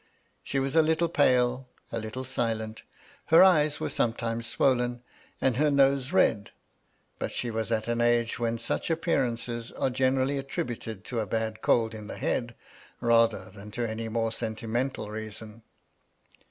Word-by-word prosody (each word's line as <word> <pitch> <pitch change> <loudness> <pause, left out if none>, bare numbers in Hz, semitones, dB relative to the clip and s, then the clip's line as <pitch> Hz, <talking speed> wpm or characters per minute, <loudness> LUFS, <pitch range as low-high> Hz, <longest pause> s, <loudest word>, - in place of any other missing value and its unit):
She - - -3
was 135 +1 0
a 160 - +7
little 160 +2 +1
pale, 125 -4 +2 0.2
a 115 - -2
little 110 +4 -5
silent; 115 -4 -2 0.4
her 165 +3 +7
eyes 155 -5 +4
were - - -2
sometimes 115 0 -1
swollen, 120 0 +1 0.4
and 130 -3 +1
her 150 +2 +3
nose 140 -2 +3
red; 100 -2 +2 0.7
but - - -3
she 120 - -3
was 110 0 -3
at 110 -1 0
an 120 0 0
age 120 -1 +2
when 115 0 0
such 115 - -2
appearances 120 -8 -1
are 130 - 0
generally 130 +2 +1
attributed 115 -6 -5
to 120 - -3
a 110 - -2
bad 110 +1 -2
cold 115 -1 +2
in 105 -1 -8
the - - -7
head, 120 -1 -2 0.4
rather 115 -2 +2
than 100 +1 -11
to 115 +2 -2
any 110 +1 -4
more 115 0 0
sentimental 115 +1 -3
reason. 110 +1 -7
120 Hz, 155 wpm, -28 LUFS, 110-130 Hz, 0.7 s, a